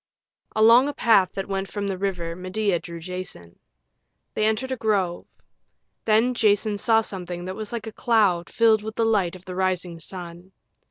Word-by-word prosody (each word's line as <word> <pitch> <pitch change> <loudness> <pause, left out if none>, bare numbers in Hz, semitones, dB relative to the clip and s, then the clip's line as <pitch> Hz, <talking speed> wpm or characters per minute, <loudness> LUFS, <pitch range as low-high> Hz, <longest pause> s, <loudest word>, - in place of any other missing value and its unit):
Along 230 +5 +6
a 290 - -6
path 210 -8 +3
that 195 - -4
went 195 0 -2
from 205 -1 -4
the 195 -1 -2
river 180 -3 -3
Medea 185 +1 -1
drew 170 0 -9
Jason. 175 - -8 0.7
They 215 - 0
entered 240 +5 -1
a - - 0
grove. 200 -7 -1 0.8
Then 225 +3 +3
Jason 210 -2 +2
saw 225 +1 +4
something 180 -4 -5
that 185 +1 -5
was 215 0 -5
like 230 -2 -4
a 220 - -6
cloud 205 -7 +1
filled 225 -2 +3
with 220 +1 -7
the 230 - +1
light 200 -6 +1
of 185 0 -14
the 185 - -7
rising 180 -2 -1
sun. 175 +2 -9
195 Hz, 175 wpm, -24 LUFS, 180-220 Hz, 0.8 s, Along